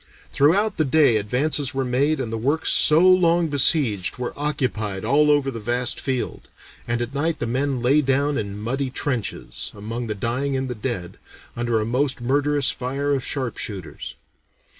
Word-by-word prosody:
Throughout 195 Hz, +9 st, +3 dB
the 155 Hz, -, +3 dB
day 140 Hz, -4 st, +4 dB
advances 135 Hz, +6 st, 0 dB
were 135 Hz, -1 st, 0 dB
made 135 Hz, +5 st, +1 dB
and 115 Hz, -4 st, -3 dB
the -, -, -1 dB
works 145 Hz, +7 st, +1 dB
so 155 Hz, +2 st, +5 dB
long 175 Hz, -2 st, +4 dB
besieged 135 Hz, -, +2 dB
were 125 Hz, -1 st, -4 dB
occupied 110 Hz, -9 st, -2 dB
all 145 Hz, +5 st, +3 dB
over 145 Hz, -2 st, +2 dB
the 115 Hz, -, -6 dB
vast 120 Hz, +3 st, -1 dB
field, 130 Hz, -2 st, -3 dB, 0.4 s
and 120 Hz, 0 st, 0 dB
at 120 Hz, +3 st, -7 dB
night 160 Hz, +3 st, -1 dB
the -, -, -3 dB
men 130 Hz, +1 st, -1 dB
"lay 140 Hz, +5 st, +4 dB
down 140 Hz, +1 st, +1 dB
in 100 Hz, -4 st, -4 dB
muddy 130 Hz, +5 st, -2 dB
trenches, 125 Hz, -3 st, -4 dB
among 115 Hz, +3 st, -5 dB
the 105 Hz, -, -3 dB
dying 130 Hz, +6 st, -1 dB
and 130 Hz, 0 st, -2 dB
the 125 Hz, -, -3 dB
dead, 105 Hz, -6 st, -5 dB, 0.4 s
under 120 Hz, -1 st, 0 dB
a 105 Hz, -, -1 dB
most 130 Hz, +4 st, 0 dB
murderous 140 Hz, +3 st, +1 dB
fire 140 Hz, +3 st, -2 dB
of 135 Hz, -2 st, -1 dB
sharpshooters. 110 Hz, -, -5 dB
130 Hz, 170 wpm, -22 LUFS, 120-145 Hz, 0.4 s, so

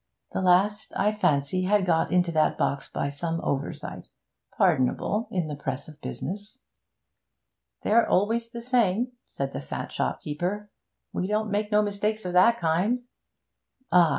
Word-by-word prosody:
The -, -, -2 dB
last, 195 Hz, +4 st, +3 dB
I 205 Hz, +2 st, +2 dB
fancy, 185 Hz, -3 st, +1 dB
had 200 Hz, 0 st, +3 dB
got 165 Hz, -3 st, +2 dB
into 180 Hz, -1 st, +3 dB
that 155 Hz, -1 st, +2 dB
box 140 Hz, -1 st, -1 dB
by 140 Hz, -, -2 dB
some 165 Hz, +4 st, -3 dB
oversight 140 Hz, +1 st, -3 dB, 0.5 s
pardonable 200 Hz, -, +2 dB
in 180 Hz, -3 st, -1 dB
the 150 Hz, -1 st, -4 dB
press 140 Hz, -1 st, -4 dB
of 155 Hz, -1 st, -14 dB
business.' 205 Hz, +6 st, -6 dB, 1.3 s
'They're 230 Hz, +2 st, +4 dB
always 230 Hz, +4 st, +2 dB
the 235 Hz, 0 st, -7 dB
same,' 240 Hz, -1 st, +2 dB, 0.2 s
said 140 Hz, 0 st, -4 dB
the -, -, -4 dB
fat 70 Hz, -, -5 dB
shopkeeper. 180 Hz, +8 st, -2 dB, 0.4 s
'We 185 Hz, -, -1 dB
don't 215 Hz, +1 st, 0 dB
make 210 Hz, +1 st, -1 dB
no 210 Hz, 0 st, +4 dB
mistakes 210 Hz, +1 st, -1 dB
of 180 Hz, -, -3 dB
that 230 Hz, +6 st, +5 dB
kind.' 185 Hz, +10 st, +1 dB, 0.9 s
'Ah! 175 Hz, -3 st, +6 dB
185 Hz, 150 wpm, -26 LUFS, 160-210 Hz, 1.3 s, Ah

